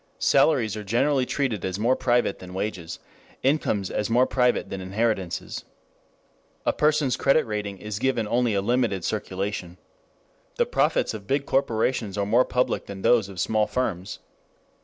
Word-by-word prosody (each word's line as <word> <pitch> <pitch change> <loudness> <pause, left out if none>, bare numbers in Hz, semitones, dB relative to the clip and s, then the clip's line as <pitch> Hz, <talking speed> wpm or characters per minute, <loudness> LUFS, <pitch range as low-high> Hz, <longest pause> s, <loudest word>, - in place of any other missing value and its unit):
Salaries 135 -7 +3
are 105 - -5
generally 130 +5 +1
treated 125 - -1
as 95 0 -2
more 120 +5 +2
private 120 -5 +1
than 90 0 -10
wages, 90 -5 -4 0.5
incomes 130 -9 +1
as 105 - -1
more 125 +3 +4
private 125 -2 +1
than 95 - -4
inheritances. 95 -1 -2 1.0
A - - +2
person's 150 -3 +2
credit 140 +3 +3
rating 105 -3 -4
is 105 +1 -5
given 120 -4 0
only 120 -1 +1
a 100 - 0
limited 115 -5 0
circulation. 95 -3 -3 0.8
The - - +2
profits - - +1
of 105 -2 -8
big 140 +3 0
corporations 115 -5 0
are 100 - 0
more 115 +5 +4
public 125 0 0
than 100 -1 -8
those 115 -5 +4
of 95 -2 -9
small 105 +4 +1
firms. 105 -5 -2
110 Hz, 155 wpm, -25 LUFS, 100-125 Hz, 1.0 s, more